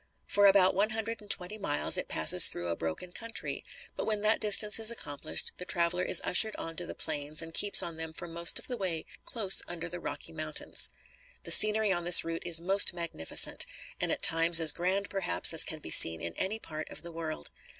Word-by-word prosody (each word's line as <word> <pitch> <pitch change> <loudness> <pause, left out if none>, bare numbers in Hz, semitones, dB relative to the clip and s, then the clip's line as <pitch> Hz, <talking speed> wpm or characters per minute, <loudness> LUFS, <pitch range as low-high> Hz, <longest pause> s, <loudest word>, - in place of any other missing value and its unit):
For 205 0 +1
about 195 -1 +2
one 205 +3 -2
hundred 225 0 -6
and 205 - -19
twenty 200 +2 -3
miles, 145 -7 -2
it - - 0
passes - - +5
through 85 0 -2
a 85 - -4
broken 80 - -8
country, 230 +4 -8 0.3
but - - -7
when 215 -2 -3
that 215 +1 0
distance 210 0 +5
is 220 0 +1
accomplished, 155 -9 -6
the - - -3
traveler 175 0 -2
is 180 - +2
ushered 215 +4 +3
on 165 0 -8
to 175 - -5
the - - -10
plains 150 0 -5
and 165 0 -12
keeps 205 +3 +4
on 165 -2 -8
them 160 0 -8
for 175 +2 -9
most 170 0 -1
of - - -8
the 245 - -6
way 180 -6 -5 0.2
close 200 -5 +3
under 175 -1 -8
the 175 +1 -9
Rocky 155 0 -9
Mountains. 155 -1 -4 0.5
The - - -5
scenery 215 -1 +6
on 175 -2 -3
this 175 0 +5
route 165 +1 -8
is 165 -1 +2
most 190 +1 +1
magnificent, 170 - +1 0.3
and - - -3
at - - -5
times 165 +1 +6
as 160 -2 +5
grand 190 +5 -4
perhaps 190 -3 -2
as 160 - +8
can 160 - -6
be - - -9
seen 80 +1 +5
in 85 0 -8
any 195 - -6
part 155 -7 -11
of - - -13
the 170 - -11
world. 160 - -9
175 Hz, 220 wpm, -27 LUFS, 160-200 Hz, 0.5 s, as